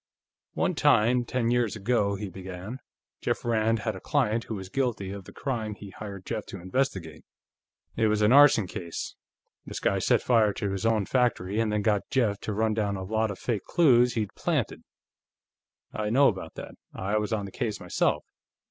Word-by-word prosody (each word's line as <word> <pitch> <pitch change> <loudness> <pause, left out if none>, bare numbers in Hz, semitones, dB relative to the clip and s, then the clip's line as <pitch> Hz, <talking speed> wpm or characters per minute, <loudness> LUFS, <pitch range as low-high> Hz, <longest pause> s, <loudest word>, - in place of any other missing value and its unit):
"One - - +1
time, 120 +3 +3
ten 120 -1 0
years 120 -4 +1
ago," 105 -1 +1
he 105 +1 -5
began, 95 +5 -7 0.4
"Jeff - - -2
Rand 115 -1 +1
had 110 -3 -2
a - - -7
client 115 - 0
who 110 - -4
was 95 -2 -6
guilty 110 -4 -1
of 100 -2 -7
the - - -11
crime 110 -6 -3
he 100 -1 -10
hired 100 -1 -8
Jeff 105 - -4
to 95 - -8
investigate. 95 - -2 0.7
It 110 -1 +2
was 105 0 +2
an 105 - +5
arson 140 -6 +7
case; 85 -2 -6 0.5
this - - -6
guy - - +1
set - - +2
fire 110 -4 +3
to 100 0 -2
his 95 +3 -1
own 110 -3 +2
factory, 110 -5 +1
and 110 -1 +1
then 105 -1 0
got 105 -2 +1
Jeff 110 -7 +1
to - - -4
run 110 +1 +1
down 105 -2 0
a 95 - -5
lot 110 +3 0
of 100 - -5
fake 115 -5 -2
clues 125 -7 +4
he'd 110 -3 -2
planted. - - -1 1.1
I 105 -1 -2
know 135 +5 +5
about 95 -4 -6
that; - - -8 0.2
I 100 +3 0
was 105 +2 -3
on 105 -3 -1
the 95 - -8
case, 110 -5 -3
myself. - - 0
110 Hz, 190 wpm, -27 LUFS, 100-120 Hz, 1.1 s, arson